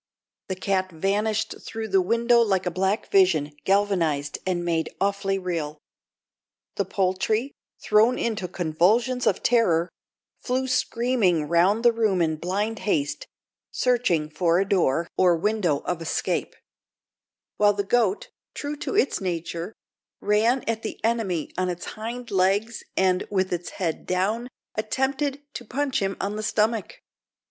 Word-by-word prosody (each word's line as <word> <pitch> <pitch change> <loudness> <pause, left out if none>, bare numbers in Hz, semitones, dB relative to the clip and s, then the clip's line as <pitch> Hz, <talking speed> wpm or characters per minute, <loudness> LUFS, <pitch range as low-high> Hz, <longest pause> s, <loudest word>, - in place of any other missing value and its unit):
The 190 - -3
cat 185 0 -1
vanished 210 +6 -1
through 220 -1 -6
the 190 -1 +4
window 235 +5 +3
like 195 -5 +2
a 180 - 0
black 190 +4 -1
vision 170 -7 +4
galvanised 175 -8 +1
and 175 -2 -1
made 165 -2 0
awfully 195 0 0
real. 165 -5 -3 1.0
The 200 - +1
poultry, 195 +7 0 0.3
thrown 215 +4 +3
into 215 -5 -2
convulsions 190 +9 +1
of - - +1
terror, 180 -8 +3 0.5
flew 260 +1 -1
screaming 230 -10 +1
round 185 +8 +3
the 240 - +8
room 220 -5 +1
in 160 -2 +1
blind 205 +7 -2
haste, 145 -9 -1 0.4
searching 185 -12 +1
for 170 +1 +2
a 195 - 0
door 170 -4 +2
or 180 -2 +5
window 180 -5 0
of 165 - -3
escape; 165 - -2 1.0
while 205 0 +5
the 200 0 -1
goat, 215 -2 +1 0.3
true 290 +1 -4
to 270 - -4
its 270 - +2
nature, 170 0 -3 0.5
ran 220 +5 +2
at 225 -1 -2
the 220 - -6
enemy 220 -9 -1
on 185 0 +1
its 175 0 -5
hind 235 +3 -6
legs, 200 +4 +1 0.2
and, 185 -1 +2
with 190 -2 0
its 175 0 -3
head 170 -4 -3
down, 205 +7 0 0.3
attempted 270 +5 -1
to - - -6
punch 265 +2 -1
him 195 0 -1
on 205 +2 -2
the - - -3
stomach. 225 - -1
195 Hz, 140 wpm, -25 LUFS, 180-225 Hz, 1.0 s, the